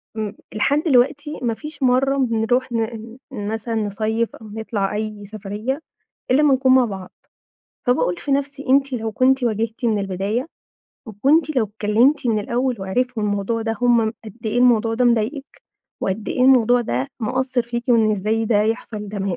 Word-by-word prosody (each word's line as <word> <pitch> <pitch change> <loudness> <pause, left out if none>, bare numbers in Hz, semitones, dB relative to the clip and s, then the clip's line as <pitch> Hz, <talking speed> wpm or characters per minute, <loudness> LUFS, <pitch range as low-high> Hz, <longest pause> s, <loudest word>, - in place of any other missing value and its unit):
م 215 -2 -3 0.2
لحد 285 +8 +1
دلوقتي 290 +1 +2
ما 235 -2 0
فيش 300 +2 -8
مرّة 265 +2 +3
بنروح 245 0 +1
ن 225 +1 -4
مثلًا 220 0 -4
نصيِّف 220 +2 -1
أو 220 - -12
نطلع 210 -2 -3
أي 210 -1 -4
سفرية 215 +7 -4 0.5
إلا 290 +4 +4
ما 285 -2 +5
نكون 260 0 +3
مع 255 -2 +5
بعض. 190 -4 -7 0.8
فباقول 210 -8 +2
في 280 - -3
نفسي 280 0 -2
أنتِ 275 0 +3
لو 225 -2 -3
كنتِ 260 +3 +3
واجهتِ 225 +2 -2
من 220 -3 +2
البداية 195 - -2 0.6
وكنتِ 280 - +1
لو 230 - +3
اتكلمتِ 220 +7 +2
من 220 -2 +2
الأول 245 +4 -1
وعرفوا 230 +4 -1
الموضوع 205 +2 -1
ده 225 0 -2
هم 235 -2 +3
قد 215 +1 -10
إيه 220 - 0
الموضوع 230 -2 +4
ده 250 +2 +1
مضايقِك، 240 +5 -1 0.4
وقد 195 +3 -2
إيه 250 - -2
الموضوع 245 -2 +5
ده 130 - -2
مأثر 255 +2 0
فيكِ 235 0 -4
وإن 225 -3 +4
إزاي 215 +3 0
ده 210 -2 +3
يحصل 215 -2 -3
ده 205 0 -5
ما 190 -3 -2
230 Hz, 165 wpm, -21 LUFS, 215-255 Hz, 0.8 s, ما